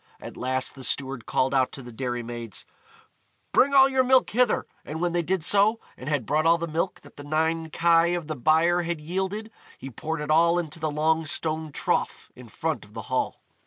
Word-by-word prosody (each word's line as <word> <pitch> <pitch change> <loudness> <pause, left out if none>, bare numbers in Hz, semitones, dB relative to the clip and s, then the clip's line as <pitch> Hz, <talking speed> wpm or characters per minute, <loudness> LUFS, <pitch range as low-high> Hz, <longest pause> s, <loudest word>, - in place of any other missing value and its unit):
At - - -9
last 130 0 -2
the 135 - -10
steward 135 -1 -1
called 130 +1 +1
out 130 -1 +2
to 135 - -8
the 120 - -10
dairy 120 0 -3
maids, 115 -2 -7 0.9
"Bring 280 +2 +4
all 270 -1 +8
your 265 -1 +2
milk 260 0 +3
hither," 245 +1 +2 0.2
and 155 +2 -6
when 175 0 0
they 175 0 +1
did 170 0 -1
so, 205 +4 +4 0.2
and 130 - -7
had 145 -6 0
brought 155 +5 +1
all 165 0 +5
the 170 0 -4
milk 165 +4 -2
that - - -18
the 145 - -8
nine 160 +2 -1
kye 165 +1 +3
of 175 -3 -4
the 155 0 -4
byre 160 +6 +3
had 170 -1 -3
yielded, 190 +7 -3 0.3
he 135 - -8
poured 160 +6 -4
it 150 - -2
all 170 +2 +4
into 165 -2 -4
the 155 -1 -1
long 160 +2 +1
stone 155 +1 -1
trough - - -2
in 125 -2 -13
front 160 +6 -3
of 105 +1 -18
the 110 - -4
Hall. 130 - -1
160 Hz, 215 wpm, -25 LUFS, 135-175 Hz, 0.9 s, all